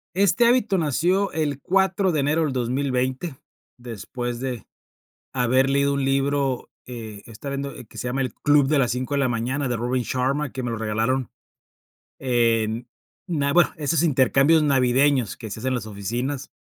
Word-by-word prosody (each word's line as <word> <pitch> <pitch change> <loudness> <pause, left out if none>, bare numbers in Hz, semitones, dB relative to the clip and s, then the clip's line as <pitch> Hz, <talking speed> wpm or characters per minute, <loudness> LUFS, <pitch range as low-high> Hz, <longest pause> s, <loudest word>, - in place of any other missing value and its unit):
Este 200 +5 +4
hábito 235 -6 +3
nació 175 +6 +1
el 145 -3 -2
4 190 0 +2
de 150 - +1
enero 150 +4 +1
del 140 - -1
2020, 130 +4 -1 0.4
después 120 +1 -6
de 125 -5 -4 0.7
haber 130 +1 +2
leído 140 0 +2
un 140 -1 -1
libro, 135 -1 0 0.2
eh, 110 -4 -8
estaba 115 +5 -8
viendo 140 0 -4
el 125 - -11
que - - -15
se 125 - -3
llama 135 +2 -1
El 130 -4 -2
club 145 -2 +3
de 150 0 +2
las 125 -3 +2
5 130 +3 -3
de - - +1
la 130 -2 +2
mañana, 125 +4 -1
de 120 - -1
Robin 125 +1 -1
Sharma, 135 +4 -1
que 130 - -5
me 120 -1 -3
lo 115 - -3
regalaron. 115 +4 -1 0.9
En, 115 -2 +1 0.4
na 145 -6 0
bueno, 175 - +5
esos 155 +1 0
intercambios 140 +1 +4
navideños 130 -3 +2
que 110 -3 -8
se 110 - -6
hace 130 - -2
en 130 - 0
las 110 -3 -3
oficinas. 120 +7 -4
135 Hz, 175 wpm, -23 LUFS, 120-145 Hz, 0.9 s, bueno